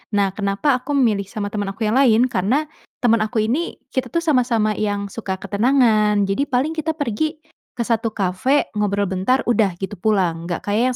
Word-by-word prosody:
Nah 200 -2 +2
kenapa 205 +7 0
aku 285 +3 -3
memilih 215 -7 +2
sama 205 0 -5
teman 205 -2 -3
aku 225 - -4
yang 215 +4 +1
lain? 250 -1 +4
Karena 240 +12 +1 0.4
teman 230 -2 +4
aku 215 0 0
ini, 275 +10 -1 0.2
kita 260 - -1
tuh 335 0 -2
sama-sama 240 -8 +2
yang 205 -1 -2
suka 195 -4 -4
ketenangan. 215 -1 +2
Jadi 200 +9 -1
paling 270 +5 0
kita 320 0 -2
pergi 290 +1 -2 0.4
ke 235 - -1
satu 225 -1 -1
cafe, 200 +9 0
ngobrol 205 -1 +1
bentar, 195 +8 +1
udah, 210 -6 +1
gitu 190 +1 -6
pulang. 180 -6 0
Gak 175 - -4
kayak 245 +4 +1
220 Hz, 180 wpm, -20 LUFS, 200-255 Hz, 0.4 s, lain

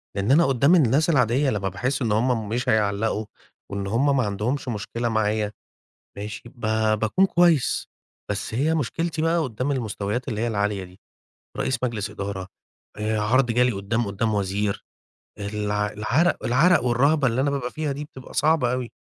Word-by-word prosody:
لإن 100 +4 0
أنا 165 +5 +6
قدّام 135 +5 +4
الناس 150 +1 +3
العادية 135 -1 +3
لمّا 100 -5 -1
باحس 125 +10 -2
إن 115 -3 0
هُم 110 0 +1
مش 120 +3 -1
هيعلّقوا، 110 +1 +1 0.5
وإن 100 0 -3
هُم 135 +7 +2
ما 130 - +3
عَندهمش 110 +7 -2
مشكلة 115 +1 -3
معايا، 110 -1 0 0.7
ماشي، 105 0 -6
ب 120 - -23 0.4
باكون 115 - +3
كويّس. 170 -7 +2 0.4
بس 105 +1 -3
هي 145 +7 +1
مشكلتي 160 +3 -2
بقى 165 +1 +2
قدّام 130 -2 -2
المستويات 115 -1 -3
اللي 110 -4 -2
هي 120 - 0
العالية 105 -3 -1
دي، 90 +1 -14 0.6
رئيس 130 - -1
مجلس 110 -4 -2
إدارة، 95 -2 -5 0.5
آآ 110 0 -1
عرض 125 +5 +3
جالي 125 +1 +3
قدّام 110 +4 -1
قدّام 105 +2 -1
وزير. 100 0 -1 0.6
الع 105 0 -1
العرق 125 +12 +1
العرق 145 +7 +4
والرهبة 135 +4 +3
اللي 120 +2 +1
أنا 140 - +2
بابقى 135 -3 -3
فيها 155 -2 -2
دي 140 +2 -4
بتبقى 130 -3 -13
صعبة 150 -5 +2
أوي. 125 -2 -3
120 Hz, 165 wpm, -24 LUFS, 105-135 Hz, 0.7 s, أنا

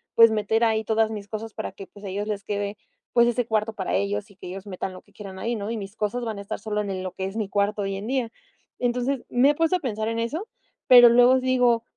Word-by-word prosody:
pues, 230 -1 +8
meter 220 +2 +1
ahí 220 -1 +2
todas 220 0 +1
mis 205 -2 -6
cosas 220 +1 -6
para - - -5
que, 195 - -10
pues, 205 - -16
a - - -5
ellos 205 +2 -3
les 205 -2 -3
quede, 205 0 -3 0.4
pues, 235 -1 +5
ese 240 0 0
cuarto 220 0 0
para 190 -3 -3
ellos 205 +1 -2
y - - -19
que - - -10
ellos 190 +2 -7
metan 190 -1 -5
lo 185 - -11
que 205 - -27
quieran 195 -2 -9
ahí, 235 +4 -2
¿no? 205 0 -4
Y 230 - -2
mis 200 0 -7
cosas 225 +3 -2
van 220 -3 -4
a - - -5
estar 200 +2 -5
solo 210 0 -2
en 195 -2 -4
lo 185 - -4
que 190 - -5
es 195 +2 -5
mi 215 - -1
cuarto 205 +1 0
hoy 195 0 -2
en 200 +3 -6
día. 250 -3 -1 0.5
Entonces, 250 +2 -1
me 260 +4 +4
he 295 - -4
puesto 330 +3 +2
a 360 - 0
pensar 220 -7 -3
en 230 0 -2
eso, 305 - -3 0.4
pero 245 -1 +9
luego 245 +2 +6
digo: 250 -3 +2
220 Hz, 270 wpm, -25 LUFS, 200-240 Hz, 0.5 s, pero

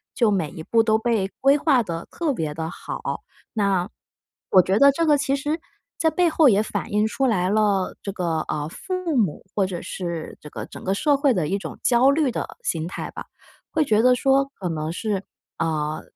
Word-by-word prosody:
就 235 -3 +3
每 170 -7 0
一 160 - -9
步 230 +5 +3
都 220 -1 +3
被 220 -4 0
规 275 +2 +5
划 280 -5 +3
得 170 -4 -5
特 325 -4 -1
别 160 - -2
地 160 0 -3
好。 - - -5 0.3
那 200 -4 +1 0.6
我 185 - +7
觉 190 +4 +1
得 280 - +8
这 335 +4 0
个 295 -1 +5
其 275 -1 0
实 295 +3 -2 0.4
在 320 -1 +3
背 350 +2 +2
后 315 -3 +5
也 205 0 +3
反 215 - -4
映 210 +1 +3
出 265 +4 0
来 185 -6 +1
了， 205 -3 +1
这 200 - -4
个， 170 -4 -1
呃， 150 -1 -2
父 365 - -3
母 195 -10 +1
或 200 - +2
者 180 -2 -5
是 170 -3 -5
这 150 - -9
个 - - -6
整 - - -11
个 190 - +1
社 290 +6 +2
会 280 -1 +3
的 160 -5 0
一 195 - 0
种 - - -8
焦 250 +2 +5
虑 285 -2 +2
的 - - -5
心 160 -1 -2
态 180 - -5
吧。 - - -7 0.5
会 315 - +2
觉 215 -4 +3
得 250 0 +6
说 270 +2 +3
可 185 - -3
能 155 -1 -3
是， 200 +1 -2 0.4
嗯， 155 -2 -1
210 Hz, 225 characters per minute, -23 LUFS, 175-275 Hz, 0.6 s, 得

